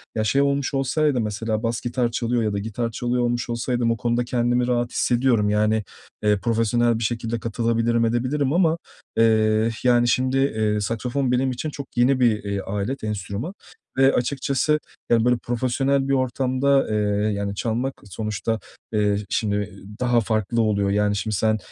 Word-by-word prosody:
Ya, 110 - 0
şey 135 +6 +2
olmuş 140 0 0
olsaydı 135 -1 +1
mesela 110 +1 -2
bas 115 +2 -1
gitar 120 -1 -1
çalıyor 120 0 0
ya 105 -1 -1
da 100 - -1
gitar 115 +3 -3
çalıyor 120 +2 -1
olmuş 120 0 -1
olsaydım 120 0 0
o 115 - -1
konuda 120 +2 0
kendimi 120 0 +1
rahat 120 -1 0
hissediyorum. 120 -4 +2
Yani, 105 +1 +2 0.4
eee, 105 -1 +3
profesyonel 115 +1 +1
bir - - -3
şekilde 115 0 -2
katılabilirim, 115 +1 0
edebilirim 130 +5 0
ama, 170 -2 +3 0.4
eee, 110 0 +3
yani, 120 -1 +4
şimdi, 130 +2 +1
eee, 110 -6 +1
saksafon 125 +5 -1
benim 130 +1 +1
için 130 +5 -4
çok 140 -2 -7
yeni 130 +2 +3
bir, 115 -4 +2
eee, 100 -1 -2
alet, 105 +7 -3
enstrüman 105 - -4 0.4
ve 135 0 +5
açıkçası, 140 +3 +1 0.3
yani, 115 -1 +3
böyle, 125 -1 +3
profesyonel 135 +3 0
bir 135 - +1
ortamda, 130 +1 +1
eee, 110 - 0 0.4
yani, 100 0 -3
çalmak 120 +5 -1
sonuçta, 105 +2 -3 0.3
eee, 105 -1 +2
şimdi 105 -1 -1 0.3
daha 120 -1 +3
farklı 110 +1 0
oluyor. 100 -2 +1
Yani, 105 0 +1
şimdi 100 +1 -2
sen, 110 +3 +2
120 Hz, 165 wpm, -23 LUFS, 110-125 Hz, 0.4 s, ve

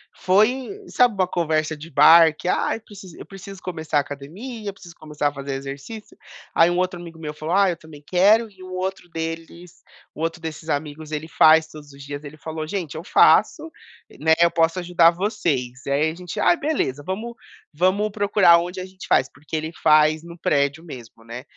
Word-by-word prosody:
foi 215 - +2 0.2
sabe 245 -2 +3
uma 190 -2 0
conversa 155 -3 -1
de 160 +3 -11
bar 160 +2 +7
que: 175 - -8
"Ah, - - 0
eu 225 - -9
precis 200 -5 -13
eu - - -11
preciso 195 0 -11
começar 160 -4 -3
a - - +6
academia, 175 - -7
eu - - -7
preciso 175 -3 -14
começar 150 -2 -3
a 145 - -2
fazer 140 0 -6
exercício", 140 +11 -8 0.4
aí 165 +1 +5
um 175 - -1
outro 180 -1 -1
amigo 165 -2 -11
meu 150 -2 -6
falou: 155 +3 -4
"Ai, 195 -2 +4
eu - - -11
também 155 -3 -14
quero", 210 +5 +4
e 190 -2 -16
um 185 - -10
outro 185 0 -4
deles 165 +1 -7 0.3
o 155 - -8
outro 165 +1 -3
desses 160 -1 -7
amigos, 155 +1 -4
ele 155 +1 -4
faz 160 0 +5
todos 150 -2 -13
os 140 - -14
dias, 145 +1 -7
ele 150 +1 -10
falou: 155 +1 -6
"Gente, 170 -5 -4
eu 160 - -6
faço", 315 - +3 0.5
né, 160 +1 +3
"Eu 170 0 +5
posso 165 +1 +1
ajudar 175 -1 +4
vocês". 160 - -2
E 140 - -3
aí 150 +3 +2
a 160 - -7
gente: 180 -1 -7
"Ah, - - +4
beleza, 270 - -2
vamos 220 +6 -4 0.4
vamos 185 +7 +1
procurar 200 -4 +4
onde 180 +2 -4
a 185 - -5
gente 190 0 -12
faz", 130 - +2
porque 150 +3 -9
ele 155 +1 -3
faz 155 0 +4
no 170 0 -11
prédio 140 +1 0
mesmo, 120 -8 -12
né, 115 +3 -8
165 Hz, 205 wpm, -22 LUFS, 150-185 Hz, 0.5 s, bar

